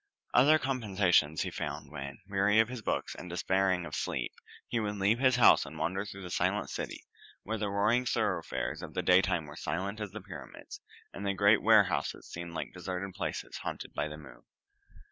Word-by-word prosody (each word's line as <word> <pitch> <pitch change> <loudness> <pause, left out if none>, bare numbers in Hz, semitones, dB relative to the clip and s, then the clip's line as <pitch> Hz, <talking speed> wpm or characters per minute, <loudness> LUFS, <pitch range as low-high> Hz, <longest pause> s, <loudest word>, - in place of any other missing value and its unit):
Other 145 +5 +6
compensations 100 - +2
he - - -4
found 75 -1 -5
when, 70 -2 -6
weary 100 +2 +3
of 110 +1 +4
his 125 -2 -6
books - - -2
and 90 - -9
despairing 95 0 +1
of 75 - -9
sleep, - - -2 0.3
he 115 - -1
would 105 -1 -2
leave 100 +4 +2
his 130 -2 +4
house 125 - +7
and - - -9
wander 95 +3 -1
through 100 0 -8
the 90 - -7
silent - - 0
city, - - -5 0.4
where 110 +1 -3
the 105 -1 -1
roaring 110 +5 +2
thoroughfares 100 -9 -1
of - - -9
the - - -1
daytime 90 -2 +3
were 75 0 -10
silent 100 +6 -3
as 105 - -3
the 105 +3 -7
pyramids, - - -10 0.3
and 100 - -7
the 100 -1 0
great 100 +1 +5
warehouses 100 -9 +3
seemed 85 0 -7
like - - -4
deserted 95 +1 -5
palaces - - -4
haunted - - -6
by 75 +1 -1
the 75 0 -8
moon. 75 - -13
100 Hz, 190 wpm, -31 LUFS, 85-110 Hz, 0.4 s, house